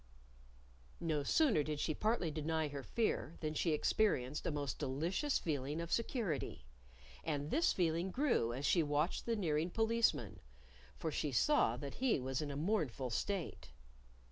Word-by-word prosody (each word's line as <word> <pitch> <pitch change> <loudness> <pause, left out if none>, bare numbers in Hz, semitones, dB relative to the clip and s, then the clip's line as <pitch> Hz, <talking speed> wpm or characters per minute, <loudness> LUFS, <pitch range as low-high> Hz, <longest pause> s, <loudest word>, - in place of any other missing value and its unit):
No 155 -3 0
sooner 235 - +3
did 150 0 -3
she 155 - 0
partly 215 -3 0
deny 155 0 -1
her 140 -1 -5
fear 170 - -1
than 155 -1 -1
she 165 - 0
experienced 150 -4 +1
a - - +1
most 145 -4 -3
delicious 170 - 0
feeling 145 -1 -2
of 170 0 -4
security! 215 - -1 0.6
And 150 -2 -2
this 330 +3 +3
feeling 170 +1 +1
grew 245 - +1
as 130 +4 -3
she 170 - +4
watched 150 +6 0
the 230 - +2
nearing 165 -4 0
Policeman. 225 +3 +1 0.6
For 160 - -2
she 150 0 -1
saw 295 - +3
that 140 -2 -6
he 260 - +3
was 130 +1 -2
in 150 - -3
a 140 - -4
mournful 145 - -1
state. 185 - -3
160 Hz, 155 wpm, -37 LUFS, 145-200 Hz, 0.6 s, she